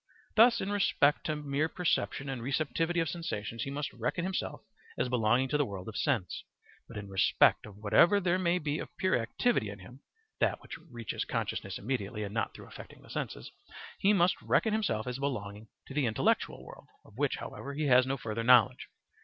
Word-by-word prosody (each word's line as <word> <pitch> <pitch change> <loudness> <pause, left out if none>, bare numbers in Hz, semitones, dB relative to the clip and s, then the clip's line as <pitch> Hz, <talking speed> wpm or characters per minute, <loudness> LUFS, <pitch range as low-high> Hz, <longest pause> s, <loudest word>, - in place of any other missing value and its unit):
Thus 230 +2 +6
in 195 - -2
respect 150 -8 +2
to 155 - 0
mere 150 +1 -1
perception 160 -5 -1
and 135 -3 -4
receptivity 155 +6 0
of 165 - -1
sensations 115 -9 -4
he 140 - -3
must 145 +1 -4
reckon 125 +9 -2
himself 190 0 -3 0.4
as 125 - 0
belonging 120 +2 +2
to 150 - +1
the - - +4
world 95 -5 -7
of 110 - -7
sense; 125 - -1 0.4
but 115 - -9
in 105 -1 -6
respect 95 +2 +3
of 100 -2 -13
whatever 140 - +5
there 180 -1 +1
may 175 -1 +2
be 150 -2 -2
of - - -6
pure 185 0 +2
activity 115 - 0
in 100 - -7
him 105 +7 -13 0.4
(that - - +1
which - - -9
reaches 120 -4 -4
consciousness - - -3
immediately 105 -2 -3
and 100 0 -6
not 110 - -2
through - - -10
affecting - - -12
the - - -14
senses), - - -5 0.5
he 200 - +4
must 185 -3 +3
reckon 220 - +2
himself 200 - 0
as 125 +1 -4
belonging 110 -6 -4 0.2
to - - -10
the 140 -3 +1
intellectual 110 - 0
world, - - -13 0.2
of 105 - -18
which, 145 -2 +1
however, 140 0 -7
he 155 +1 -1
has 125 -2 +5
no 135 +1 -1
further 115 -2 -4
knowledge. 125 +1 +5
135 Hz, 195 wpm, -31 LUFS, 110-160 Hz, 0.5 s, Thus